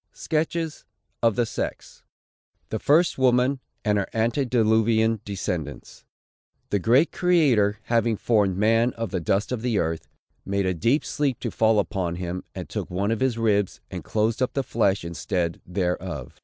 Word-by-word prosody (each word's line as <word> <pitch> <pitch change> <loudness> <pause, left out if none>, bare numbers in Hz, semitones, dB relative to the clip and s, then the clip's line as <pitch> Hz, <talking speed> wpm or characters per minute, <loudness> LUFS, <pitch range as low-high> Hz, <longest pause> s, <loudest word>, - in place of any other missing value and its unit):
SKETCHES 160 0 -2 0.4
OF 115 -3 +3
"THE 120 - +2
SEX." - - -5 0.7
THE - - -2
FIRST 155 +1 +3
WOMAN, 130 +1 +3 0.3
AND 105 -1 +2
HER 100 - -2
ANTEDILUVIAN 115 -2 +2
DESCENDANTS. 85 - -5 0.7
The 100 - +2
great 125 - +3
Creator, 135 - +3
having 115 -2 +1
formed 100 -5 +1
man 115 +4 +3
of 115 -1 -4
the 95 - -1
dust 95 +7 0
of 125 -3 -2
the 120 -3 0
earth, 80 -3 -2 0.4
"made 100 0 -1
a 95 - +1
deep 115 - +1
sleep 140 -5 -1
to - - -3
fall 110 -1 +3
upon 95 -4 -1
him, 90 +1 -4
and - - -6
took - - -5
one 100 +4 -1
of 115 - 0
his 130 -3 +1
ribs, 105 -4 +1
and - - -6
closed 110 +3 0
up 130 - 0
the 135 - 0
flesh 100 -7 0
instead 85 0 -2
thereof. 90 -6 -3
110 Hz, 160 wpm, -24 LUFS, 95-125 Hz, 0.7 s, OF